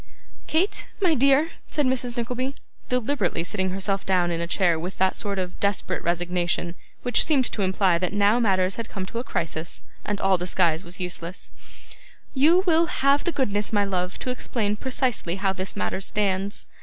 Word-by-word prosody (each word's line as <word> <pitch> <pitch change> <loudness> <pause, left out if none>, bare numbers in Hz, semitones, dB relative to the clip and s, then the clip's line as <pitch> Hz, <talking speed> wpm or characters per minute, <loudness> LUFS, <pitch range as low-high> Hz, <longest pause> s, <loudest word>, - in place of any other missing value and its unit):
'Kate, 345 +6 +1
my 365 -5 +3
dear,' 275 +4 +4 0.2
said 295 - 0
Mrs. 250 -1 -1
Nickleby, 250 +3 -2 0.3
deliberately 250 - 0
sitting 190 +1 -1
herself 195 +1 -1
down 180 -2 +2
in 170 0 -2
a 170 - -2
chair 175 -2 +2
with 180 +4 -5
that 190 0 +2
sort 200 -2 -2
of 180 -1 -4
desperate 200 -2 0
resignation 175 0 -1 0.3
which 245 - +3
seemed 275 -5 +3
to 210 - -3
imply 185 -2 +2
that 180 -1 -1
now 205 +3 +3
matters 190 -4 +2
had 230 -2 -5
come 190 -2 -4
to 230 +5 -5
a - - -3
crisis, 165 - -4 0.2
and 205 -1 -2
all 190 -2 +3
disguise 175 -2 +1
was 175 +1 -7
useless, 180 0 -5 0.8
'you 320 +7 +5
will 335 -1 +4
have 280 -1 +2
the 345 - +1
goodness, 210 -8 -1
my 205 -2 +2
love, 180 -1 -2
to 255 - -3
explain 215 -4 -1
precisely 250 -7 -1
how 195 0 0
this 190 0 -5
matter 100 - -2
stands. 195 0 -1
195 Hz, 180 wpm, -25 LUFS, 180-250 Hz, 0.8 s, you